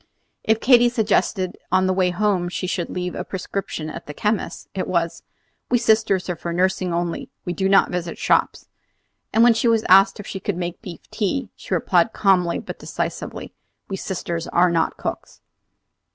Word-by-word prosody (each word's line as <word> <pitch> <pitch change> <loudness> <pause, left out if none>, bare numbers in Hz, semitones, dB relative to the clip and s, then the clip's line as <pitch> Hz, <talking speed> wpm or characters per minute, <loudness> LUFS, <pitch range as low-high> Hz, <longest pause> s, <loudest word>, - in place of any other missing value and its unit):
If 220 0 +2
Katy 245 -1 +5
suggested 210 -5 +1
that - - -20
on 185 0 +3
the 185 - +2
way 185 -1 +2
home 180 -1 0
she 185 - -4
should 180 -1 -2
leave 180 0 -3
a - - -4
prescription 190 -4 -5
at 155 - -8
the 150 - -7
chemist's, 210 0 -2
it 190 - -3
was: 170 -2 -1 0.5
"We 245 - +4
sisters 215 -5 +2
are 180 - -2
for 170 +1 -5
nursing 185 +1 0
only; 170 0 -2 0.2
we 175 - -2
do 190 +1 0
not 195 0 +4
visit 175 -1 -3
shops." - - +1 0.6
And 225 - +4
when 240 -1 +7
she 225 - 0
was 225 -1 +2
asked 195 +2 +6
if 205 - -7
she 195 - -5
could 190 -1 -3
make 175 -1 -4
beef 180 -7 -10
tea, 230 +6 -2
she - - -3
replied - - +2
calmly 180 -4 +2
but - - -7
decisively, - - -5 0.4
"We 195 - -2
sisters 170 -3 -4
are 175 0 +3
not 165 -1 0
cooks." - - -6
185 Hz, 185 wpm, -22 LUFS, 175-210 Hz, 0.6 s, when